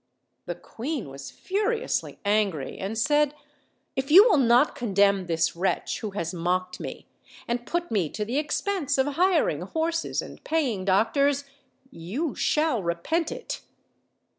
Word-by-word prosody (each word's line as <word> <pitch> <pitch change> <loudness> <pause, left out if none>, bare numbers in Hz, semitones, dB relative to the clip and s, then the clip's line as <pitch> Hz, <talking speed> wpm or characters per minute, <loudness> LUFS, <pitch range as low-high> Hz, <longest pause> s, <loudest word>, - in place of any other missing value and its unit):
The - - -3
queen 255 - -5
was 135 0 -8
furiously 430 +5 -2
angry, 200 -9 0
and 200 +4 -3
said, 295 +4 +2 0.6
"If 265 +1 -2
you 365 +7 +10
will 360 - +4
not 245 +3 +4
condemn 200 -4 +2
this 165 -1 +1
wretch, 185 +3 -1
who 215 - -4
has 180 -3 -4
mocked 180 +1 -1
me - - -7 0.2
> - - -20
and 240 0 -2
P - - -14
ut 345 0 -5
me 190 -8 +1
to 210 - -4
the 250 +6 0
expense 300 -1 -1
of 265 - +3
hiring 335 - +2
horses 325 - -1
snd - - -11
paying 255 -12 0
doctors, 275 +9 +2 0.5
you 240 - -3
shall 300 -7 +1
repent 185 - -1
it." - - -5
240 Hz, 150 wpm, -26 LUFS, 190-310 Hz, 0.6 s, you